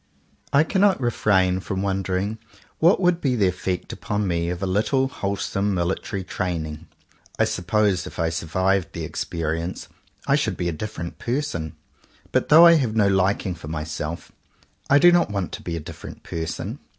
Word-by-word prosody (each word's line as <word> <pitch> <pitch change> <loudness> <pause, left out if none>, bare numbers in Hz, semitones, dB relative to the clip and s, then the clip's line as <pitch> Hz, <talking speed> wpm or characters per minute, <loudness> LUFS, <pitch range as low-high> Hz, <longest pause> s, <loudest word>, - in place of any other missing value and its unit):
I 140 +2 +5
cannot 195 +1 +3
refrain 95 -7 +2
from 95 0 -3
wondering 95 +2 -1 0.4
what 170 +5 +5
would 180 -2 +2
be 130 -3 +1
the 100 -5 +3
effect 90 0 -3
upon 105 -1 -2
me 85 -1 0
of 90 +2 -4
a - - +2
little 110 +8 +1
wholesome 100 -3 -2
military 95 +2 -2
training. 85 -4 -4 0.5
I - - +3
suppose 95 +1 0
if - - -10
I 80 -1 +1
survived 95 +4 0
the - - -5
experience, 85 +2 -3 0.4
I 140 - +3
should 110 -10 -1
be 90 - -1
a - - 0
different 85 0 -6
person. 120 - -3 0.6
But - - +1
though 160 +3 +9
I 170 -1 +8
have 120 -7 -1
no 105 -3 +4
liking 95 0 +1
for 80 -3 -10
myself, 75 +1 -5 0.6
I 140 - +6
do 175 +5 +7
not 175 -7 +3
want 100 -4 -3
to - - -7
be 85 - -4
a - - -3
dif 75 - -10
ferent - - -10
person. 80 -1 -4
95 Hz, 175 wpm, -23 LUFS, 85-115 Hz, 0.6 s, though